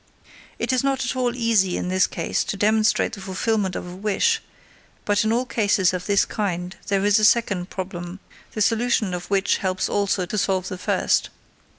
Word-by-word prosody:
"_ - - -36 0.5
It - - -1
is 255 - +1
not 270 -3 0
at 255 - -2
all 250 -1 0
easy 225 -7 +2
in 180 - -3
this 185 0 +3
case - - -2
to 200 - -4
demonstrate 215 +2 +2
the 200 - -7
fulfillment 190 0 -1
of - - -4
a 180 0 -8
wish, 215 - +1 0.6
but 205 0 +2
in 220 - +1
all 245 +3 +1
cases 205 -6 +2
of 180 -1 -4
this 200 -1 +3
kind 180 -3 -3
there 195 0 +1
is 205 +1 +4
a - - -1
second 205 -5 +2
problem, 180 -1 -6 0.3
the 215 - -3
solution 225 -3 +1
of 180 0 -5
which 195 -1 +2
helps 185 -1 -1
also 200 -2 0
to 210 +4 -2
solve 190 -1 0
the 185 -2 -6
first. - - +1
200 Hz, 200 wpm, -23 LUFS, 185-220 Hz, 0.6 s, is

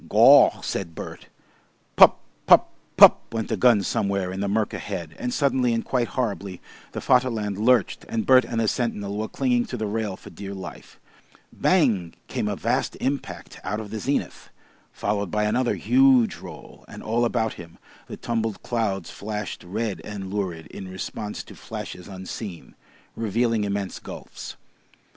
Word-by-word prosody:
"Gaw!" - - +7
said 85 -4 -4
Bert. - - -8 0.7
"Pup - - +8 0.3
pup - - +6 0.3
pup" - - +9
went 115 -1 -3
a - - +2
gun 110 -1 +4
somewhere 100 -1 -1
in 95 - -5
the 100 - -1
mirk 105 +2 0
ahead 80 -3 -5
and 125 - -2
suddenly 130 -4 +2
and 115 - -2
quite 125 -3 0
horribly 100 -6 -2 0.3
the - - -3
Vaterland 115 -6 +1
lurched, 120 0 +2
and 115 -1 -1
Bert 130 -1 +6
and 115 - -3
the 115 - +1
sentinel 105 -4 -2
were 110 +1 -2
clinging 125 -2 +1
to 125 - -5
the 110 - -2
rail 105 -2 -2
for - - -13
dear 100 0 -7
life. 95 - -10 0.5
"Bang!" 115 - +2
came - - -2
a - - -1
vast - - -1
impact 140 +1 -4
out 105 +2 -2
of 105 -2 -7
the 110 - -4
zenith, 140 +6 -2 0.4
followed 100 -2 -2
by 105 +4 0
another 120 +4 +1
huge 255 -4 +4
roll, - - -12
and - - -10
all 115 +2 +1
about 110 -2 0
him 85 -1 -12 0.3
the - - -7
tumbled 115 -2 -2
clouds 100 -7 -2
flashed 105 0 -5
red 100 -1 -3
and 100 -2 -6
lurid 90 -6 -3
in 95 - -8
response 95 +3 -5
to - - -13
flashes 90 -1 -8
unseen, 95 -1 -8 0.4
revealing 115 0 0
immense 100 -2 -3
gulfs. - - -9
105 Hz, 160 wpm, -24 LUFS, 100-120 Hz, 0.7 s, pup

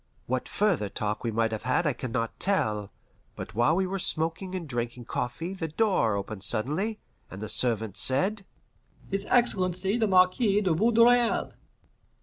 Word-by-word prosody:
What 130 0 -2
further 185 - +1
talk 105 +3 -3
we 115 - -1
might 115 0 0
have 110 - -4
had 130 +7 0
I 150 - +2
can 125 0 -6
not 115 -1 -3
tell, 105 - +1 0.5
but - - -8
while 120 +9 +3
we 190 +1 +1
were 195 +1 -3
smoking 165 +3 -2
and 175 -4 -5
drinking 120 -1 -4
coffee 165 +12 -3
the 175 -4 -4
door 160 - +1
opened 100 0 -5
suddenly, 150 - -1 0.3
and 95 - -9
the 110 - -5
servant 110 -4 0
said, 190 - +2 0.7
"His 195 +1 -2
Excellency 190 -4 +1
the 220 - +2
Marquis 195 +3 +3
de 185 -5 +1
Vaudreuil!" 235 +5 +3
160 Hz, 160 wpm, -27 LUFS, -, 0.7 s, while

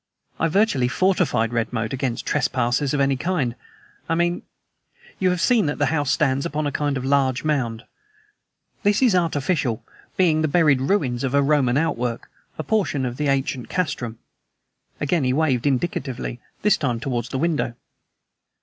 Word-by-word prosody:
"I 165 - +2
virtually 165 - +2
fortified 135 -8 +1
Redmoat 115 0 -1
against 130 -3 -2
trespassers 125 +2 0
of - - 0
any 135 0 +2
kind, 135 -5 -1 0.6
I 165 - +2
mean. 175 +1 0 0.8
You 185 - +3
have 180 -1 0
seen 225 - +3
that 145 - -2
the 145 - +2
house 145 -4 0
stands 135 +1 +2
upon 155 -2 -2
a 145 - -1
kind 145 -1 -1
of 130 - -4
large 135 -2 +2
mound. 125 -7 -1 1.0
This 205 +3 +2
is 240 -6 +5
artificial, 155 -7 0 0.3
being 165 -4 +3
the 155 - +2
buried 150 -4 +3
ruins 135 -7 0
of 135 0 0
a 140 - +4
Roman 140 -3 +2
outwork; 125 -7 -2 0.3
a 155 - -3
portion 150 -6 0
of 125 0 -4
the 150 - -1
ancient 135 -2 -1
castrum." 140 -10 -2 0.8
Again 150 +1 +1
he 125 0 +1
waved 135 -3 +1
indicatively, 130 -3 -2 0.2
this 210 - +4
time 125 -5 -1
toward 120 -2 -2
the 125 - -4
window. 150 -5 0
140 Hz, 160 wpm, -22 LUFS, 125-165 Hz, 1.0 s, is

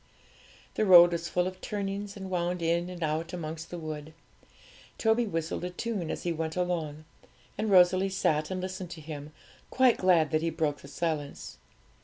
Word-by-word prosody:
The - - 0
road 175 -1 +9
was 170 0 -3
full 180 0 +1
of 185 0 -6
turnings, 200 -1 -4
and 190 -1 -7
wound 175 -1 -1
in 170 +2 +1
and 175 -2 -6
out 160 +3 -2
amongst 160 -1 -5
the 175 - -6
wood. 155 -1 -7 0.8
Toby 225 +1 +2
whistled 165 -2 -3
a 180 - -2
tune 190 -2 -3
as - - -4
he 175 - 0
went 160 -1 -3
along, 165 -4 -2 0.5
and 215 - -2
Rosalie 185 0 +5
sat 155 -5 0
and 185 -1 -3
listened 185 -1 -5
to 170 - -8
him, 150 -1 -8 0.4
quite 255 -2 +4
glad 170 -5 +4
that 155 - +2
he 165 - 0
broke 155 -3 -1
the - - -12
silence. 145 - -4
170 Hz, 180 wpm, -29 LUFS, 155-185 Hz, 0.8 s, road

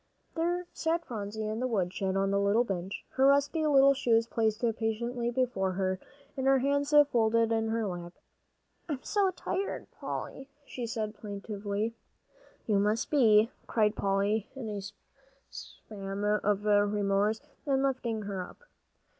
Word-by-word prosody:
There 350 +2 -1
sat 330 +1 -1
Phronsie 215 -1 -5
in 215 +1 -3
the 255 - 0
woodshed 190 -3 -1
on 195 0 +1
the 200 - +2
little 200 +4 +3
bench, 195 -3 -4
her 265 +1 +3
rusty 285 +3 +3
little 275 -1 +6
shoes 230 -4 +2
placed 220 -2 0 0.2
patiently 235 +2 -1
before 240 -7 0
her, 185 0 -1 0.4
and 265 0 -1
her 270 0 +6
hands 285 +2 0 0.2
folded 230 -1 +3
in 225 0 +1
her 225 0 0
lap. 175 -2 -5 0.8
"I'm 285 -3 -3
so 400 -2 +2
tired, 375 +1 -3
Polly," 270 +1 -6 0.2
she 245 -4 -5
said 215 -2 -3
plaintively. 205 +1 -4 0.7
"So 215 - 0
you 200 - +4
must 210 +4 0
be!" 225 -5 +5 0.2
cried 215 -1 +2
Polly, 200 +2 0
in 250 -5 -5
a 205 -1 -4 0.7
spasm 195 -1 -7
of 210 0 +1
remorse, 205 0 +2 0.3
and 270 -1 +2
lifting 240 -5 -1
her 200 -2 -4
up. 180 - -11
220 Hz, 145 wpm, -30 LUFS, 200-260 Hz, 0.8 s, little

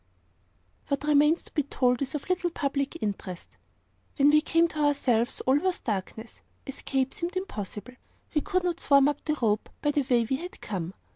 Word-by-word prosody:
What 280 0 -1
remains 300 +2 +4
to - - -15
be 300 - +2
told 250 -3 +1
is 270 +1 -2
of 295 - -5
little 365 -1 0
public 280 -1 -2
interest. 190 -4 -5 0.6
When 285 +1 +6
we 305 0 +5
came 330 +2 +3
to 310 - -6
ourselves, 270 -6 +1
all 265 +2 +3
was 370 +2 0
darkness. 220 +2 -5 0.2
Escape 270 -1 -2
seemed 350 +2 -4
impossible. 220 - -5 0.4
We 300 - +2
could 370 +1 0
not 350 -1 -1
swarm 280 -1 +5
up 290 -1 -2
the 305 -1 -1
rope, 215 -3 +1
by 295 - +1
the 295 - +1
way 240 -2 +4
we 265 - 0
had 355 +5 -8
come. 185 -3 -5
280 Hz, 185 wpm, -27 LUFS, 240-310 Hz, 0.6 s, When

